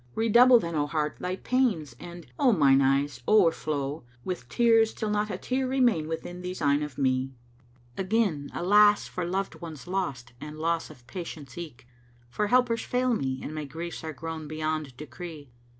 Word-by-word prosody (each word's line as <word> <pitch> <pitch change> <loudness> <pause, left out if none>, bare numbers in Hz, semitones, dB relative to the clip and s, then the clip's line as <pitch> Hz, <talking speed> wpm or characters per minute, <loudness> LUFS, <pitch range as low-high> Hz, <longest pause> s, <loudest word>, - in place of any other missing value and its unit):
Redouble 240 +3 +6
then, 170 -5 -4
O 145 -2 0
Heart, 150 -1 -2
thy 180 +1 -2
pains 195 - 0
and, 175 -1 -9
O 255 - +5
mine 135 -9 +5
eyes, 140 +1 +1
o'erflow 155 -8 +2
* 120 0 -30
With 185 -1 -5
tears 225 -2 +3
till 215 -2 -2
not 210 0 0
a 185 - -3
tear 255 +5 -1
remain 245 -12 +2
within 175 +2 -5
these 180 +1 -5
eyne 145 -1 +2
of 150 -4 -5
me? 130 -1 0 0.6
Again 190 -7 0
alas 205 +3 +4
for 180 - -4
loved 190 +2 -3
ones 160 -6 -8
lost 140 -10 -3
and 150 0 -8
loss 165 +1 -1
of 130 -6 -15
patience 150 -3 -8
eke! 155 -8 -8 0.2
* 120 0 -31
For 210 +11 0
helpers 245 0 +3
fail 250 0 0
me 130 - -2
and 155 - -5
my 155 -1 -4
griefs 165 +5 -6
are 160 - -4
grown 160 +1 -6
beyond 155 -3 -3
decree. 150 0 -9
165 Hz, 180 wpm, -27 LUFS, 145-205 Hz, 0.6 s, Redouble